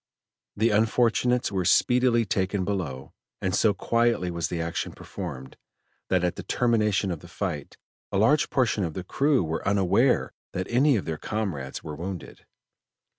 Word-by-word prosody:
The 110 +2 +3
unfortunates 120 +3 +2
were 95 -2 0
speedily 125 +4 +3
taken 95 -1 -1
below, 80 -10 -4 0.3
and 95 - -1
so 110 - +4
quietly 115 -4 +1
was 85 -1 -2
the 85 - -4
action 85 0 -3
performed, 70 -9 -8 0.5
that 90 -1 +2
at 90 - 0
the - - -4
termination 105 -5 +1
of 85 - -4
the - - -13
fight - - -5 0.3
a 100 - 0
large 135 +10 +3
portion 120 -6 +1
of 80 -3 -3
the 95 - -4
crew 140 +5 +2
were 80 0 -3
unaware 100 -3 +2 0.2
that 95 - -2
any 135 +3 +4
of 100 - -2
their 80 -2 -4
comrades 90 -12 -4
were 75 - -6
wounded. 90 +2 -7
100 Hz, 160 wpm, -26 LUFS, 85-115 Hz, 0.5 s, so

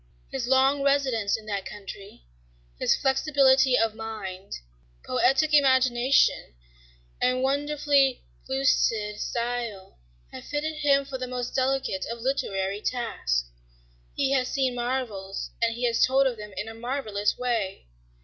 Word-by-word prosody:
His 255 -3 -3
long 265 +2 +3
residence 265 -8 +1
in 220 - -13
that 200 -2 -3
country, 200 - -10 0.6
his - - +3
flexibility 265 -2 +4
of 225 -1 +1
mind, 210 -4 -7 0.5
poetic 270 - +2
imagination, 260 - +3 0.7
and 255 +1 +2
wonderfully 280 -1 +2 0.2
pellucid 225 -6 +1
style 235 - -4 0.3
have - - -9
fitted 305 +1 -3
him 280 -2 +3
for 270 -1 -6
the 255 - -4
most 250 -1 -4
delicate 260 -7 0
of 235 0 -5
literary 200 -6 -2
tasks. - - -2 0.6
He 275 -1 +1
has 260 -2 +2
seen 265 -2 0
marvels, 240 -6 -3
and 230 -1 +1
he 245 +1 -2
has 230 -1 +2
told 270 +1 +4
of 260 -3 +1
them 210 -1 -9
in 210 - -3
a 225 - -7
marvelous 225 -4 -2
way. 230 - -2
250 Hz, 130 wpm, -26 LUFS, 215-270 Hz, 0.7 s, flexibility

